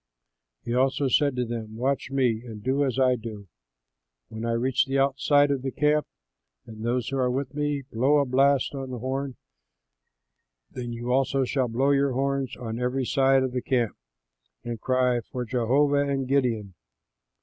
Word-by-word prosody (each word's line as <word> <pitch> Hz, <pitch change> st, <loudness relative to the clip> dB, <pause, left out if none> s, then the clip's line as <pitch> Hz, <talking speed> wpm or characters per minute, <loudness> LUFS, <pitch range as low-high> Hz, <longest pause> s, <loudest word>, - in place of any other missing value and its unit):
He 120 Hz, -, -2 dB
also 135 Hz, +2 st, +2 dB
said 140 Hz, +1 st, +2 dB
to 125 Hz, -1 st, 0 dB
them, 115 Hz, -2 st, -6 dB
"Watch 135 Hz, +3 st, -1 dB
me 125 Hz, -5 st, +1 dB
and 110 Hz, -4 st, -9 dB
do 135 Hz, +3 st, +1 dB
as 130 Hz, -2 st, -1 dB
I 130 Hz, -1 st, +4 dB
do. 110 Hz, -4 st, -8 dB, 0.8 s
When 110 Hz, +1 st, -6 dB
I 115 Hz, -, 0 dB
reach 125 Hz, +3 st, +1 dB
the 135 Hz, +1 st, 0 dB
outside 140 Hz, +1 st, +3 dB
of 135 Hz, -2 st, -1 dB
the 135 Hz, -, -2 dB
camp 150 Hz, +2 st, +1 dB, 0.6 s
and 110 Hz, -1 st, -10 dB
those 120 Hz, 0 st, -1 dB
who 135 Hz, -, -2 dB
are 130 Hz, -1 st, +2 dB
with 130 Hz, +1 st, -3 dB
me 145 Hz, -1 st, -1 dB
blow 130 Hz, +3 st, +2 dB
a 140 Hz, -, +3 dB
blast 135 Hz, +2 st, +2 dB
on 135 Hz, -1 st, -5 dB
the 125 Hz, -, -5 dB
horn, 130 Hz, +2 st, -3 dB, 1.4 s
then 120 Hz, -1 st, -5 dB
you 120 Hz, +1 st, -4 dB
also 135 Hz, +1 st, +2 dB
shall 130 Hz, 0 st, 0 dB
blow 130 Hz, +5 st, +1 dB
your 140 Hz, -1 st, +2 dB
horns 135 Hz, 0 st, -1 dB
on 115 Hz, -1 st, -5 dB
every 125 Hz, +1 st, -1 dB
side 135 Hz, 0 st, +3 dB
of 130 Hz, -, -2 dB
the 125 Hz, 0 st, -2 dB
camp 120 Hz, -5 st, 0 dB, 0.7 s
and 120 Hz, -2 st, -5 dB
cry, 130 Hz, -1 st, +2 dB
'For 125 Hz, +2 st, -6 dB
Jehovah 140 Hz, +5 st, +2 dB
and 135 Hz, -2 st, -1 dB
Gideon!'" 120 Hz, -8 st, 0 dB
130 Hz, 175 wpm, -26 LUFS, 120-140 Hz, 1.4 s, I